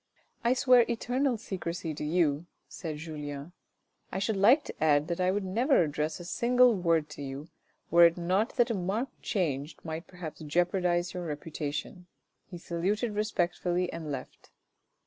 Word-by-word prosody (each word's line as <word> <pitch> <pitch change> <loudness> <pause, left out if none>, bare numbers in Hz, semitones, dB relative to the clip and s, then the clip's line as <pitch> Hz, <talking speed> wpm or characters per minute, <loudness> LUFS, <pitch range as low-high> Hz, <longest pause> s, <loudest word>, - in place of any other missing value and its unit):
" - - -41
I 235 +1 +4
swear 255 -2 +5
eternal 245 +2 0
secrecy 180 -5 -4
to 150 - -6
you," 155 0 +1 0.2
said 160 -4 -6
Julien. 150 -1 -6 0.3
" - - -44
I - - -3
should 205 +3 0
like 235 +10 +5
to - - -6
add 150 -1 +4
that 170 +1 -1
I 180 - +3
would 200 +2 0
never 230 - +3
address 150 +1 -2
a 175 - -8
single 245 +6 +4
word 165 -5 +1
to 150 - -9
you, 140 +3 -6 0.4
were 170 0 +8
it 170 - -3
not 185 +7 0
that 240 -3 +3
a - - +1
marked 205 +7 -3
change 150 - -2
might 160 +1 -5
perhaps 175 -3 -8
jeopardise 175 +2 +1
your 180 -2 -4
reputation." 150 +3 -5 0.4
He 180 - -7
saluted 195 +7 -1
respectfully 180 -3 0
and 160 -3 -5
left. 130 -2 -7
175 Hz, 165 wpm, -29 LUFS, 155-205 Hz, 0.4 s, were